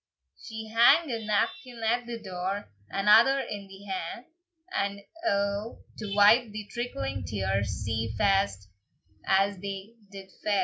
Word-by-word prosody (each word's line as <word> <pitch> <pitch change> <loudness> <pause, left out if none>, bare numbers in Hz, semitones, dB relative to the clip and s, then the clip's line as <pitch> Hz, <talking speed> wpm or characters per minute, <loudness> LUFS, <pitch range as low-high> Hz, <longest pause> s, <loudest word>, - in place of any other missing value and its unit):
She 220 -1 -7
hang 265 +7 +5
ae 225 -1 -3
napkin 230 +2 -1
at 235 +2 +1
the 235 -1 -5
door, 190 0 -4 0.2
Another 220 - +5
in 205 -6 -5
the 195 +1 -13
ha, 190 +3 -4 0.5
And 200 0 -1 0.2
a' 200 -4 0 0.2
to 205 -2 -4
wipe 215 +4 +6
the 210 0 -6
trickling 95 - -3
tears, 100 +1 -2
Sae 110 +1 -1
fast 195 - +2 0.6
as 195 0 +3
they 200 +2 -6 0.2
did 195 -1 -11
fa. 205 -2 +2
200 Hz, 135 wpm, -28 LUFS, 190-225 Hz, 0.6 s, wipe